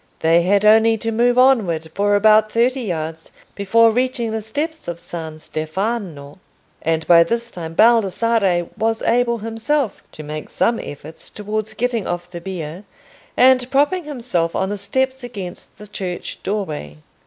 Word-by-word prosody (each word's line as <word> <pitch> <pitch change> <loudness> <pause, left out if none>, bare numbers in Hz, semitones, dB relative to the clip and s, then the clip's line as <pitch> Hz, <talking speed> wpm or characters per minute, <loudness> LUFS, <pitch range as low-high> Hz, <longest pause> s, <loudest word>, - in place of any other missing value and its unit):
They 165 +1 +4
had 200 +4 +2
only 225 +1 +5
to 225 +1 -3
move 240 +2 +2
onward 195 -12 +3
for 205 0 +2
about 215 +1 +4
thirty 250 +3 +1
yards 160 -6 -5 0.2
before 225 +3 +3
reaching 245 -1 -1
the 220 0 -2
steps 300 +9 -4
of 170 -1 -5
San 160 -3 -7
Stefano, 155 -1 -4 0.4
and 160 0 -1
by 170 -1 +7
this 235 +5 -3
time 165 -2 -7
Baldassarre 220 -4 +3
was 225 0 0
able 235 0 +2
himself 225 +3 -2
to 155 - -9
make 150 +1 -7
some 230 0 +1
efforts 150 +2 -9
towards 215 +1 -4
getting 235 -3 -1
off 175 0 -4
the 170 -1 -7
bier, 175 -1 -6 0.5
and 255 -1 +5
propping 290 +6 +1
himself 235 - -2
on 190 - 0
the 205 - -2
steps 260 +6 -1
against 200 -7 -8
the 210 - -11
church 185 -3 -6
doorway. 155 - -4
210 Hz, 155 wpm, -20 LUFS, 170-235 Hz, 0.5 s, by